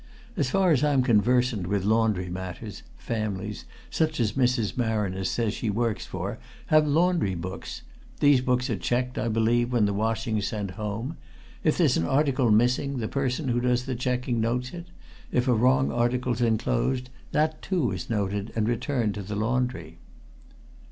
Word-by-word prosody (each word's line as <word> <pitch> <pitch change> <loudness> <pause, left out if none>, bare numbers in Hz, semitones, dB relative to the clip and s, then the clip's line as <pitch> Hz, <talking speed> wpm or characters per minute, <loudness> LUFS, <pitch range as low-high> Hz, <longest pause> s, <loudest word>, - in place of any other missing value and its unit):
As 140 - 0
far 190 +2 +3
as 145 -2 +3
I'm 140 -3 +3
conversant 120 -3 +2
with 100 0 0
laundry 110 -4 +2
matters, 95 +3 -6 0.2
families, 105 -2 -4 0.3
such 155 -2 0
as 110 -3 +2
Mrs. 125 -5 +1
Marriner 105 -6 -1
says 105 +3 0
she 115 - -2
works 110 +1 -1
for, - - -5 0.3
have 155 -1 +6
laundry 160 - +2
books. 95 +2 -6 0.4
These 145 -3 +5
books 125 0 +1
are 110 - 0
checked, 125 +4 -1
I 115 - -1
believe, 115 +2 +2
when 120 -4 +3
the 100 - 0
washing's 110 0 -1
sent 105 -3 -3
home. 110 - -4 0.5
If - - +2
there's - - +3
an 80 - 0
article 135 -3 +2
missing, 125 +5 +2
the 110 -3 -2
person 135 +2 -1
who 120 0 +1
does 125 0 +1
the 130 - -2
checking 125 -1 -1
notes 125 +2 -1
it; 175 0 -8 0.4
if 125 +1 +1
a 125 - +4
wrong 130 +3 +3
article's 120 0 0
enclosed, 125 +2 0 0.2
that, 155 +1 +1
too, 170 - 0
is 90 -2 -5
noted, 100 -1 -1
and 110 -1 +1
returned 120 -2 0
to 105 - -5
the 105 +2 -5
laundry." 125 +4 -2
120 Hz, 165 wpm, -26 LUFS, 105-130 Hz, 0.5 s, have